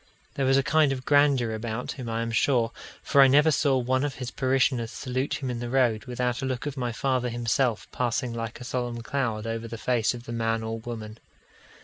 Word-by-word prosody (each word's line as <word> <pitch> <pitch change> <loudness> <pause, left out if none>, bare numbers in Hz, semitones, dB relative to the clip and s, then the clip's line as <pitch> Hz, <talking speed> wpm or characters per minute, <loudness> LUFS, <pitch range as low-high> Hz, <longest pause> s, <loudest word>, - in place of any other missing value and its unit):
There 135 -1 0
was 135 +1 +4
a 135 - +3
kind 155 0 +3
of 130 -1 -4
grandeur 140 -5 +3
about 110 +2 -4
him, 125 -4 -6
I 115 0 -1
am 115 - -3
sure; 120 -1 +2 0.3
for 140 - +5
I 135 - +8
never 150 +4 +5
saw 140 -1 +2
one 130 +2 +1
of 145 -2 -2
his 125 -2 -5
parishioners 130 -3 +1
salute 130 +4 -3
him 130 - -1
in 120 - -4
the 120 0 -4
road, 120 -4 +2
without 125 0 -2
a - - -2
look 130 0 -3
of 145 -2 -3
my 125 -3 -2
father 125 +1 0
himself 120 0 0
passing 120 0 -1
like 115 -1 -5
a - - -8
solemn 120 -1 -3
cloud 115 -5 -2
over 115 0 -3
the 115 0 -6
face 120 0 +1
of 120 - -9
the 120 - -8
man 115 -1 0
or 110 0 -4
woman. 110 -2 -7
125 Hz, 225 wpm, -26 LUFS, 115-135 Hz, 0.3 s, I